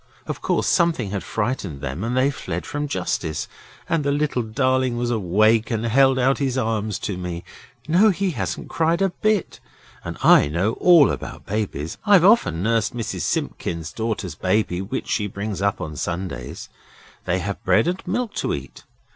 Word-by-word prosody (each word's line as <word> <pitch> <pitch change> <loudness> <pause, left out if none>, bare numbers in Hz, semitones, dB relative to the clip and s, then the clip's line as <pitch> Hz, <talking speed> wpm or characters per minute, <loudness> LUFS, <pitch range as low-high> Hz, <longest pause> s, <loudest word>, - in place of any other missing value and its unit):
Of - - -5
course - - 0
something 165 - +2
had 100 -2 -2
frightened 105 - -3
them 70 +7 -4
and 120 +2 -1
they 135 +2 +3
fled 90 -9 -5
from 145 0 -3
justice. 90 - -2 0.4
And 165 -3 0
the 140 - +1
little 145 -3 0
darling 130 +2 0
was 120 0 -1
awake 110 +2 +2
and 115 -1 -1
held 135 +3 +4
out 130 +1 +2
his 135 -2 0
arms 110 -4 -1
to 100 -4 -3
me. 85 -1 -5 0.4
No, 185 +7 +5
he 190 0 0
hasn't 130 - -4
cried 165 +3 +1
a 195 - +3
bit, 215 +1 -1 0.4
and - - -6
I - - +7
know 90 +9 0
all 170 -5 +6
about - - -7
babies; 95 -7 -3
I've 200 -5 +5
often 140 - +4
nursed 115 +2 +1
Mrs 115 -2 -3
Simpkins's 85 -1 -3
daughter's 110 -5 -3
baby 95 +1 0
when 95 - -3
she 105 - -1
brings 100 0 -4
it - - +1
up 100 - 0
on 80 -4 -5
Sundays. 85 -5 -5 0.6
They 90 0 +1
have 100 +2 -4
bread 95 - +3
and 180 +2 -1
milk 225 +3 -1
to - - 0
eat. - - -10
115 Hz, 180 wpm, -22 LUFS, 95-140 Hz, 0.6 s, I